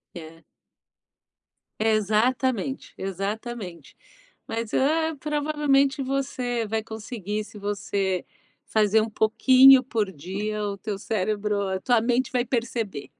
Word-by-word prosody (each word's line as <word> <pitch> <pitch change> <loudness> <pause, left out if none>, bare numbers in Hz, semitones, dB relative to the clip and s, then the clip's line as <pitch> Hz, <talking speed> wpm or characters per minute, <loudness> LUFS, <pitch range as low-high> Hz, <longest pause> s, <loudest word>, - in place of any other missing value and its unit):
É. 165 0 -11 1.3
É 220 0 +2
exatamente, 245 +5 0
exatamente. 195 0 -5 0.5
Mas 225 0 -4
é, 320 +4 +2
provavelmente 290 -2 +1
você 255 -3 -2
vai 220 +1 -1
conseguir. 215 -2 -5
Se 210 0 -12
você 200 -2 -2 0.4
fazer 215 0 +3
um 220 - -2
pouquinho 255 +5 +6
por 215 -6 -1
dia, 200 +7 -4
o 200 -1 -3
teu 205 -1 -4
cérebro 205 -1 -1
a 190 0 -2
tua 240 +1 +2
mente 245 +2 0
vai 250 -2 +1
perceber. 230 - -3
220 Hz, 115 wpm, -25 LUFS, 205-255 Hz, 1.3 s, pouquinho